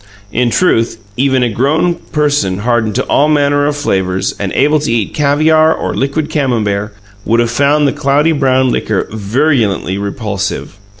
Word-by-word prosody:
In 120 +1 +1
truth, 115 -6 +1 0.2
even 130 +1 +1
a 120 - +1
grown 150 +10 +1
person 145 - -1
hardened 110 -1 0
to - - 0
all 145 - +2
manner 145 -1 +2
of 145 - -1
flavours, 95 -9 -1
and 100 -2 -3
able 150 +2 +2
to 145 -4 -2
eat 115 -4 -1
caviar 155 +2 +3
or - - -3
liquid 140 +3 -1
Camembert, 110 -9 -1 0.3
would 115 +3 +1
have 120 -1 +1
found 145 +3 +2
the 135 - 0
cloudy 145 +4 +1
brown 130 -3 +2
liquor 105 -3 -1
virulently 110 -3 0
repulsive. 100 -1 -4
130 Hz, 160 wpm, -13 LUFS, 110-145 Hz, 0.3 s, caviar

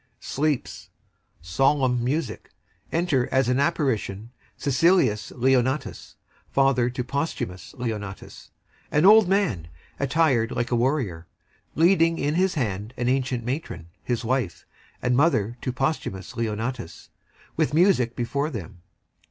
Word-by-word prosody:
[Sleeps] 150 -2 -2 0.5
Solemn 125 - +2
music. 150 +6 -2 0.4
Enter, 160 -7 +1
as 130 -2 +2
in 125 - +2
an - - 0
apparition, 125 - -1 0.3
SICILIUS 140 - +2
LEONATUS, 130 +2 0 0.3
father 135 -3 +2
to 125 0 -3
POSTHUMUS, 125 - -4 1.2
an 150 +4 +3
old 210 -1 +7
man 180 - +1 0.3
attired 135 -4 +2
like 120 0 -2
a - - +3
warrior; 115 - -1 0.5
leading 165 0 +4
in 145 +1 0
his 185 +2 +1
hand 110 -3 -3
an 120 0 0
ancient 130 -2 0
matron, 125 - -4
his 120 -2 -2
WIFE, 120 -8 -1 0.4
and 125 0 +2
mother 120 -7 +2
to 130 - -2
POSTHUMUS, 130 -7 -3 1.2
with 140 - 0
music 160 -10 +3
before 140 +5 -1
them. 95 - -8
130 Hz, 115 wpm, -24 LUFS, 120-155 Hz, 1.2 s, old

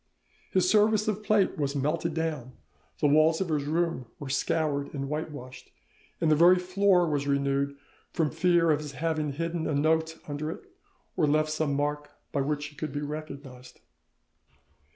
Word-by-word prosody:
His 185 -1 +2
service 215 +1 +3
of 215 -1 -1
plate 210 -5 +2
was 140 -1 -1
melted 155 +4 -1
down, 155 -6 -3 0.5
the 150 - +4
walls 155 +2 +4
of 190 -3 -2
his 150 -3 0
room 165 -4 -1
were 145 - -7
scoured 145 -1 0
and 140 -1 -3
whitewashed, 145 -4 -6 0.5
the 155 -2 +3
very 175 +4 +6
floor 180 0 +3
was 145 -2 -1
renewed, 140 0 0 0.3
from 155 -3 0
fear 170 0 +3
of 150 - +2
his 150 -2 -7
having 155 +1 -1
hidden 165 +2 -2
a 150 - 0
note 160 +2 +1
under 150 +1 -3
it, 165 - -7 0.5
or 160 -4 +2
left 155 +1 +2
some 155 -2 0
mark 145 +1 -2 0.2
by 140 - 0
which 145 +1 -1
he 145 0 -10
could 155 0 -4
be 145 +1 -3
recognised. 140 -4 -8
155 Hz, 165 wpm, -28 LUFS, 145-165 Hz, 0.5 s, very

